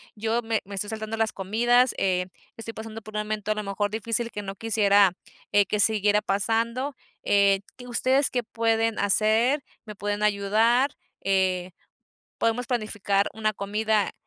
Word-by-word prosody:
yo 225 +2 -1
me 225 -1 -1
me 200 +1 -8
estoy 205 +1 -2
saltando 220 0 -4
las 225 -1 0
comidas, 240 +6 +2
eh, 180 -1 +1 0.3
estoy 230 0 -7
pasando 220 0 -8
por 215 0 -12
un 210 - 0
momento 210 0 -3
a - - +1
lo 210 - -3
mejor 205 +1 -2
difícil 230 +2 -2
que 210 - -6
no 195 -1 -6
quisiera, 205 -3 +3 0.4
eh, 205 -1 +5
que 210 +2 -2
siguiera 210 0 +3
pasando, 230 +7 -1 0.3
eh, 200 -1 +3 0.2
¿qué 245 -1 -11
ustedes 260 +3 +2
qué 245 -1 -1
pueden 225 0 0
hacer? 220 +7 +2 0.2
¿Me 210 -1 -9
pueden 205 +1 -3
ayudar? 215 +6 +2 0.3
Eh, 185 -2 0 0.7
podemos 230 +2 0
planificar 205 -4 0
una 215 -1 0
comida, 210 +1 0
215 Hz, 160 wpm, -25 LUFS, 200-230 Hz, 0.7 s, eh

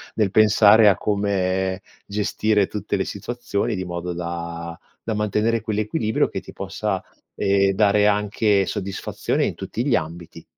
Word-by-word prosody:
nel 105 -4 +1
pensare 110 0 +6
a 100 - +2
come 95 -2 -1 0.3
gestire 105 0 +1
tutte 105 +2 -3
le - - -1
situazioni 120 -2 -3
di 95 -1 -4
modo 90 0 -4
da 85 -1 -5 0.3
da 115 - -1
mantenere 105 +2 0
quell'equilibrio 110 0 0
che - - -4
ti - - -13
possa, - - -3 0.3
ehm, 100 0 +2
dare 105 +1 +3
anche 105 -1 +2
soddisfazione 95 +1 -2
in - - -2
tutti 120 - -4
gli 135 -5 +3
ambiti. 85 +1 -5
100 Hz, 140 wpm, -22 LUFS, 95-110 Hz, 0.3 s, pensare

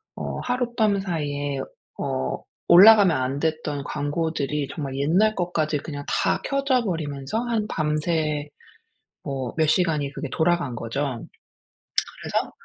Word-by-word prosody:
어 - - -4
하룻밤 240 -5 +1
사이에 145 -6 -2 0.4
어 65 0 -2 0.3
올라가면 195 0 +8
안 130 +2 -1
됐던 155 -3 -2
광고들이 145 -1 -2
정말 140 -4 -4
옛날 180 +10 +3
것까지 160 -4 0
그냥 145 -1 -7
다 - - +1
켜져 275 -3 +1
버리면서 150 -2 -3
한 230 -3 -1
밤새 155 -2 -1 0.8
뭐 130 -3 -4
몇 160 -1 +3
시간이 155 -5 +1
그게 145 0 -5
돌아간 165 -5 +1
거죠. 115 +4 -4 1.2
그래서 - - -1
155 Hz, 250 characters per minute, -24 LUFS, 145-185 Hz, 1.2 s, 올라가면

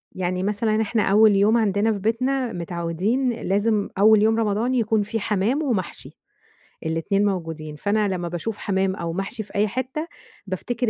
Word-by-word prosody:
يعني 185 0 -2
مثلًا 215 +2 0
إحنا 220 0 0
أول 210 +1 +5
يوم 205 +4 +4
عندنا 210 0 +2
في 210 - -2
بيتنا 250 +4 0
متعودين 175 +9 -1
لازم 210 -1 0
أول 215 +1 +6
يوم 220 +1 +3
رمضان 220 +3 0
يكون 220 -2 +2
في 215 +2 -3
حمَام 215 +7 0
ومحشي، 220 - -3 0.8
ال2 165 +6 0
موجودين، 165 -6 -3
فأنا 205 +6 0
لمّا 180 -3 -2
باشوف 175 +6 -4
حمَام 190 -1 0
أو 170 -2 -4
محشي 195 +4 -4
في 200 - -16
أي 205 +1 +2
حتة 260 +8 -4 0.4
بافتكر 230 +6 -2
205 Hz, 160 wpm, -23 LUFS, 190-225 Hz, 0.8 s, أول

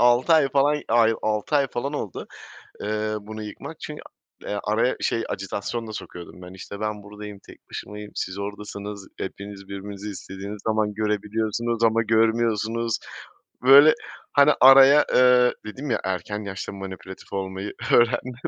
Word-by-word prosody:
6 120 +6 +4
ay 150 -4 +5
falan, 145 +2 +2
ay, 115 -1 +4
6 110 +7 0
ay 140 - +3
falan 130 +4 -3
oldu, 110 - -5 0.6
eee, 110 +1 -2
bunu 110 +1 -8
yıkmak 105 - -9
çün - - -7 0.6
araya 115 +4 +1
şey, 115 - 0
ajitasyon 105 +4 -4
da 110 - -7
sokuyordum 90 -3 -9
ben. 90 +1 -10
İşte, 100 +1 -9
ben 105 -1 -3
buradayım, 105 0 -9
tek - - -16
başımayım, 105 0 -8
siz 95 +1 -4
oradasınız, 100 0 -6
hepiniz 100 0 -7
birbirinizi 100 +1 -7
istediğiniz 100 +1 -7
zaman 110 -1 +1
görebiliyorsunuz 110 +2 -1
ama 115 0 +3
görmüyorsunuz. 115 0 +1 0.7
Böyle, 140 +4 +9 0.4
hani, 145 +1 +6
araya, 135 +2 +8
ııı, 125 -1 +5
dedim 130 +6 -6
ya - - +1
erken 105 +3 -3
yaşta 95 -1 -5
manipülatif 95 -1 -9
olmayı 95 +1 -4 0.2
öğrendim. 120 +1 +3
110 Hz, 140 wpm, -24 LUFS, 100-120 Hz, 0.7 s, Böyle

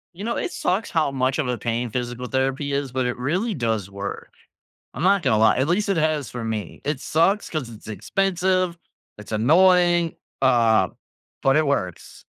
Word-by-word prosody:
You 200 - -8
know, 235 +1 -1
it 365 - -2
sucks 195 - -1
how 160 -3 +2
much 130 +1 0
of 150 - 0
a 125 -1 -1
pain 120 +1 -2
physical 120 +2 -4
therapy 135 +2 -1
is, 140 -2 -2
but 130 0 -1
it 125 - -3
really 180 - -1
does 110 -6 -1
work. 100 0 -6 0.6
I'm - - -6
not 195 0 +3
gonna 120 -5 +3
lie. 110 - +5
At 130 +3 +1
least 200 +4 +1
it 195 - +1
has 155 -4 0
for 120 -2 -6
me. 110 -5 -4
It 145 -2 -2
sucks 190 +9 +1
'cause 150 -7 -3
it's 110 -2 -13
expensive, 185 - 0 0.4
it's 105 +1 -11
annoying, 175 - +4 0.3
uh, 115 -7 +4 0.5
but 135 +2 +4
it 155 - +3
works. 95 -12 -3
135 Hz, 185 wpm, -23 LUFS, 120-175 Hz, 0.6 s, lie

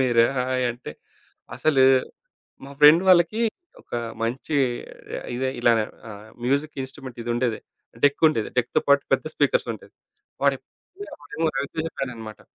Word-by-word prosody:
మేరా 120 -3 +4
hi 130 0 0
అంటే 120 -10 -9 0.6
అసలు 135 0 +3 0.8
మా 140 - -10
ఫ్రెండ్ 150 +4 +8
వాళ్ళకి 180 +4 +4 0.4
ఒక - - -9 0.3
మంచి 130 +6 -2 0.8
ఇదే 130 +1 -1
ఇలానే 115 -2 +3 0.3
ఆహ్, 105 +1 -11 0.2
మ్యూజిక్ 140 +4 0
ఇన్స్ట్రుమెంట్ 130 -2 -11
ఇదుండేది. 120 -1 -1 0.5
డెక్కుండేది 145 -5 +3
డెక్‌తో 120 - +1
పాటు 140 0 +5
పెద్ద - - -4
స్పీకర్స్ - - +1
ఉంటయి. - - -15 0.5
వాడెప్పుడు - - 0 0.3
నుంచో 305 -8 -8
వాడు 160 -1 -2
రవితేజ 160 +3 -3
ఫ్యాననమాట. 115 -5 -6
130 Hz, 125 wpm, -24 LUFS, 120-155 Hz, 0.8 s, ఫ్రెండ్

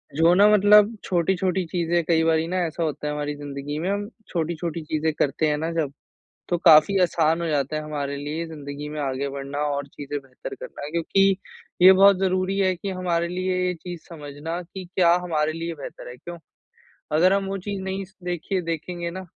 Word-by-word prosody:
जो 165 +3 +5
ना 200 +3 +6
मतलब, 210 +1 +6
छोटी-छोटी 185 +1 0
चीज़ें 170 0 0
कई 160 -1 +3
बारी 160 0 +2
ना 185 +2 -2
ऐसा 165 +1 -3
होता 150 -1 -3
है 150 - -1
हमारी 150 0 -3
ज़िंदगी 145 0 -6
में, 175 +4 -2
हम 205 +1 -2 0.2
छोटी-छोटी 170 -1 -3
चीज़ें 155 +1 -1
करते 150 +1 0
हैं 150 0 +1
ना 160 +2 -2
जब, 160 -4 -1 0.6
तो 175 - +1
काफ़ी 165 +6 +6
आसान 165 -2 +2
हो 170 - -1
जाता 145 0 0
है, 155 - -2
हमारे 145 -2 -4
लिए 150 +4 -4
ज़िंदगी 145 -2 -7
में 150 0 -5
आगे 135 0 -2
बढ़ना 140 +1 -5 0.2
और 140 0 -3
चीज़ें 145 +1 -6
बेहतर 130 -2 -9
करना 145 - -8
क्योंकि 190 +4 +2 0.5
ये 185 - +10
बहुत 195 +1 +6
ज़रूरी 185 +1 0
है 185 -1 +2
कि 195 +3 -5
हमारे 175 -2 -1
लिए 185 +1 -1
ये 180 - 0
चीज़ 175 +1 -8
समझना 155 +1 -6
कि 185 +2 -9
क्या 170 -2 +5
हमारे 155 -3 0
लिए 165 +1 -4
बेहतर 145 - -9
है। 125 - -9
क्यों? 175 +6 -9 0.8
अगर 185 +5 +5
हम 200 0 +1
वो 195 0 -2
चीज़ 200 -1 -3
नहीं 190 +1 -3
स 190 +2 -25
देखिए 180 +2 -2
देखेंगे 170 +1 -4
ना, 185 +1 -7
170 Hz, 200 wpm, -24 LUFS, 150-185 Hz, 0.8 s, ये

